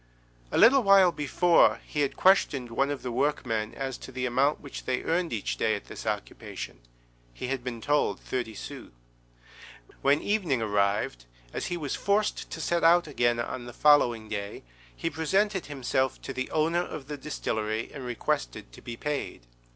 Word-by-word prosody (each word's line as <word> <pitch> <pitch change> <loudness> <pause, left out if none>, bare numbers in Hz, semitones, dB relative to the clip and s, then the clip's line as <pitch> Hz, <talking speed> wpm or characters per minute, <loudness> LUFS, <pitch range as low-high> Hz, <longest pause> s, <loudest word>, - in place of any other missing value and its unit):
A - - 0
little 265 +4 +7
while 195 -4 +6
before 165 +3 +3
he 150 - -4
had 140 - -1
questioned 140 -10 +3
one 135 +4 +1
of 145 -2 -4
the 125 - -3
workmen 115 -5 -1
as 135 -2 -4
to - - -10
the 130 0 -3
amount 135 +4 +2
which 140 - -9
they 130 -1 -1
earned 170 0 0
each 110 -4 -2
day - - +1
at - - -7
this - - -9
occupation; - - -5 0.6
he 125 - -5
had 135 -2 -2
been 120 -2 -5
told 145 +3 +1
thirty 120 -4 -4
sous. - - -8 1.1
When 140 +2 +4
evening 185 - 0
arrived, 100 - 0 0.3
as - - -3
he 175 - -2
was 145 -5 -3
forced 205 +1 0
to - - -6
set 170 +1 0
out 170 +1 +6
again 120 -5 +1
on 120 +1 -4
the 120 - -9
following 120 -7 +4
day, 100 -1 -5 0.3
he 165 - -3
presented 190 +4 0
himself 130 -2 -1
to 135 - -5
the 130 0 -3
owner 165 +3 +1
of 155 -5 -7
the 150 - -4
distillery 110 -6 -3
and 140 - -7
requested - - -3
to - - -13
be 115 -1 -7
paid. 150 - -3
135 Hz, 175 wpm, -28 LUFS, 120-160 Hz, 1.1 s, little